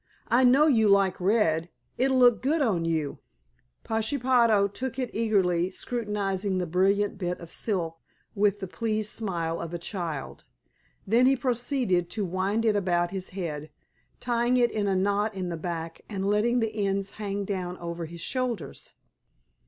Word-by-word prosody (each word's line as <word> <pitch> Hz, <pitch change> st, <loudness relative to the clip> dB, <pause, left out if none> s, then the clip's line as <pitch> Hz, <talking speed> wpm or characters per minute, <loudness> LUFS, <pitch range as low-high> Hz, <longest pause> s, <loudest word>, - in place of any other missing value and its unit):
I 240 Hz, +3 st, +4 dB
know 265 Hz, +4 st, +6 dB
you 225 Hz, -8 st, +4 dB
like 195 Hz, -2 st, +3 dB
red. 175 Hz, -5 st, +2 dB, 0.3 s
It'll 265 Hz, +1 st, +2 dB
look 245 Hz, -2 st, +5 dB
good 300 Hz, +5 st, +1 dB
on 200 Hz, -, +1 dB
you." 160 Hz, -3 st, -1 dB, 0.6 s
Pashepaho 230 Hz, -2 st, +2 dB
took 255 Hz, +5 st, -5 dB
it 255 Hz, -2 st, -2 dB
eagerly, 185 Hz, -6 st, +1 dB
scrutinizing 200 Hz, -3 st, -2 dB
the 180 Hz, -, 0 dB
brilliant 195 Hz, +4 st, +1 dB
bit 180 Hz, -1 st, -2 dB
of 170 Hz, -1 st, -10 dB
silk 170 Hz, -6 st, -2 dB, 0.3 s
with 205 Hz, -1 st, +1 dB
the 190 Hz, -, -3 dB
pleased 215 Hz, +1 st, -2 dB
smile 170 Hz, -6 st, -2 dB
of 170 Hz, 0 st, -5 dB
a -, -, -1 dB
child. 170 Hz, -5 st, -4 dB, 0.6 s
Then 235 Hz, +5 st, +4 dB
he 270 Hz, -, +5 dB
proceeded 245 Hz, -7 st, 0 dB
to 210 Hz, 0 st, -2 dB
wind 190 Hz, +5 st, -1 dB
it 215 Hz, -2 st, +3 dB
about 175 Hz, -3 st, +1 dB
his 190 Hz, -1 st, -4 dB
head, 155 Hz, -4 st, -4 dB, 0.5 s
tying 240 Hz, 0 st, +1 dB
it 240 Hz, -2 st, +3 dB
in 210 Hz, -2 st, -1 dB
a 195 Hz, -, +1 dB
knot 205 Hz, +2 st, +1 dB
in 185 Hz, -2 st, -3 dB
the 170 Hz, -, -3 dB
back 165 Hz, 0 st, -5 dB
and 195 Hz, -3 st, -3 dB
letting 230 Hz, +4 st, +2 dB
the 215 Hz, -2 st, -1 dB
ends 195 Hz, 0 st, -1 dB
hang 200 Hz, -1 st, -2 dB
down 185 Hz, -2 st, -3 dB
over 170 Hz, 0 st, -5 dB
his 170 Hz, +1 st, -9 dB
shoulders. 250 Hz, -, -3 dB
200 Hz, 160 wpm, -27 LUFS, 175-230 Hz, 0.6 s, know